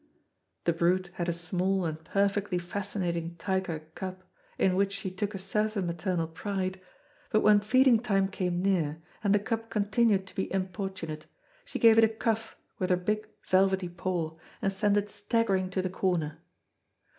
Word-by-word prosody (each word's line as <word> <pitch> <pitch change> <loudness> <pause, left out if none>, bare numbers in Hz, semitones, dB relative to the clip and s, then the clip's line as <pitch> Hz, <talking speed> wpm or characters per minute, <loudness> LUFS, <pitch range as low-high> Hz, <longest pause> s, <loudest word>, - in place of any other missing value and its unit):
The 170 - +2
brute 175 +2 +1
had 175 -1 -2
a - - +1
small 180 +2 0
and 160 0 -4
perfectly 200 +1 +1
fascinating 175 -2 -3
tiger 185 -2 -2
cub, 185 -1 -6 0.3
in 185 -1 +3
which 195 +1 +2
she 195 -1 -4
took 200 +2 -3
a - - -2
certain 210 +1 -1
maternal 170 -1 -1
pride; 185 +2 -3 0.5
but 215 - +3
when 210 0 +6
feeding 250 +3 +5
time 195 -5 +2
came 180 -2 -2
near, 165 -5 +1 0.2
and 200 - +2
the 205 - +6
cub 225 +2 -3
continued 210 -1 +2
to 185 - -13
be 190 - -3
importunate, 185 -4 -4 0.4
she - - -4
gave 225 -1 +7
it - - +7
a 220 - +6
cuff 225 0 -2 0.2
with 185 - 0
her 180 - +4
big 215 +4 -2 0.2
velvety 190 -1 +3
paw, 175 -2 -2 0.2
and 195 - 0
sent 205 +1 +2
it 205 0 +1
staggering 205 -3 +1
to 185 0 -1
the 185 - -1
corner. 175 -6 -1
190 Hz, 170 wpm, -29 LUFS, 180-205 Hz, 0.5 s, gave